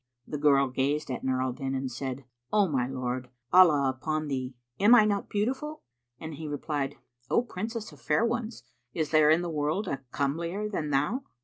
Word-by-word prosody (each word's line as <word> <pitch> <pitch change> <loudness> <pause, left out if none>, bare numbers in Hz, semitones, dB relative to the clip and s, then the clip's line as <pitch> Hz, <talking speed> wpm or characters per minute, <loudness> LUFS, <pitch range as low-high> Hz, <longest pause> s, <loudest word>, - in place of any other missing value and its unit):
The 150 - -5
girl 140 -2 +4
gazed 135 +3 -1
at 125 - -4
Nur 130 -1 +1
al 130 -1 -1
Din 135 0 -3
and 130 -1 -3
said, 130 +1 -5 0.3
"O 205 -2 +4
my 130 -6 0
lord, 130 -1 -3 0.2
Allah 160 -7 +7
upon 155 +3 -2
thee, 130 -1 -3 0.2
am 210 +5 +7
I 215 -3 +7
not 205 -2 -1
beautiful?"; 265 +9 -2 0.4
and 160 0 -6
he 155 +1 -6
replied, 145 -1 -2 0.3
"O 235 - +3
Princess 225 +1 -5
of - - -16
fair 230 - +2
ones, 235 -1 -3 0.3
is 155 -2 -1
there 155 -1 +5
in 160 +3 +4
the - - -2
world 155 +7 -1
a 135 -4 -3
comelier 165 +8 -1
than 160 -8 -3
thou?" 150 - +1
150 Hz, 190 wpm, -28 LUFS, 135-200 Hz, 0.4 s, Allah